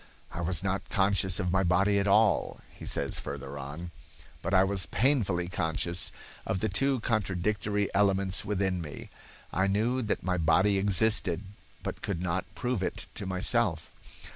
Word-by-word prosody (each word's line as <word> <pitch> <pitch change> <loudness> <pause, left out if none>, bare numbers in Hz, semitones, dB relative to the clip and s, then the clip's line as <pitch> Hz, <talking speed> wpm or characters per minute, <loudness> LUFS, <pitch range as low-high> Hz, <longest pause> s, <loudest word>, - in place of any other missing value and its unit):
"I 85 - -5
was 90 +2 0
not 100 0 -2
conscious 95 -2 +2
of 90 -3 0
my 95 +1 +3
body 95 +3 +3
at 100 - 0
all," 105 +2 +3
he - - -10
says - - -2
further 70 0 -6
on, 75 +6 -7 0.5
"but - - -3
I 95 -1 +5
was 95 -1 +1
painfully 100 -7 +1
conscious 85 0 -1 0.3
of 95 - -2
the 110 - 0
two 135 -3 +1
contradictory 105 0 0
elements 95 -1 +2
within 95 -3 -1
me. 75 -3 -8 0.4
I 95 +1 +2
knew 115 +6 +1
that 110 - -2
my 90 -1 0
body 95 +5 +3
existed, 100 -2 +2 0.4
but - - -5
could 95 -4 -3
not 90 +1 -1
prove 125 -5 -1
it - - -2
to 100 - -5
myself. 95 -2 +1
95 Hz, 160 wpm, -29 LUFS, 90-105 Hz, 0.5 s, I